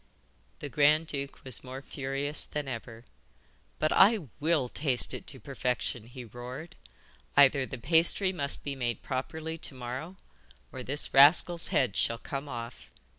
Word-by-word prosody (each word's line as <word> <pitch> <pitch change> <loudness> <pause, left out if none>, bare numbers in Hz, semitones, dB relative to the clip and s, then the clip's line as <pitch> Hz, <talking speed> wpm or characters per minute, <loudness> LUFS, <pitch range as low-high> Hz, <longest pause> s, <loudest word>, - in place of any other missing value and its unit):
The 145 - -5
grand 150 +2 +4
duke 140 -3 -5
was 130 -4 -1
more 130 +1 -8
furious 140 +2 -2
than 150 -2 -5
ever. 115 -2 -7 0.7
'But 155 - +1
I 200 -2 +5
WILL 150 -4 +1
taste 130 -4 0
it - - -7
to - - -6
perfection,' 125 -2 -3
he 125 0 -10
roared. 125 +8 -9 0.6
'Either 140 -1 +5
the - - -6
pasty 170 - +3
must 140 -5 +2
be 140 - -3
made 120 -3 -3
properly 160 +5 -4
to 140 - -4
morrow 130 +8 -6 0.6
or 130 - -7
this 140 +4 -1
rascal's 165 +4 +6
head 130 - +1
shall 115 - 0
come 140 +4 -6
off. 120 -1 -8
140 Hz, 150 wpm, -29 LUFS, 125-155 Hz, 0.7 s, rascal's